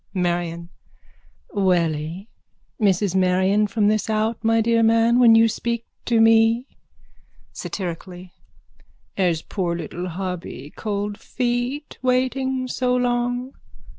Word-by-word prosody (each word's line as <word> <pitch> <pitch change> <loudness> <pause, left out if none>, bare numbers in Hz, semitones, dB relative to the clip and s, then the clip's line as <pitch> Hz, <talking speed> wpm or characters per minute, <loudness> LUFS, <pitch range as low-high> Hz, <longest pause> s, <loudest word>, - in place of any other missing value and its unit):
MARION: 175 -1 -2 0.8
Welly? 175 -2 0 0.5
Mrs 195 -2 +2
Marion 190 +3 +2
from 210 0 +1
this 215 +1 +1
out, 220 +1 -1
my 225 0 +3
dear 230 +1 +2
man, 230 +2 +4
when 230 -2 +7
you 225 0 +6
speak 235 +1 -3 0.2
to 235 -2 +2
me. 225 +2 +4 0.9
(Satirically.) 180 -1 -6 0.8
Has 175 -4 0
poor 175 -4 -2
little 170 +2 -5
hubby 175 -6 -6
cold 205 -1 -3
feet 245 +5 -3
waiting 255 0 0
so 250 0 0
long? 245 +1 -1
215 Hz, 105 wpm, -22 LUFS, 180-235 Hz, 0.9 s, when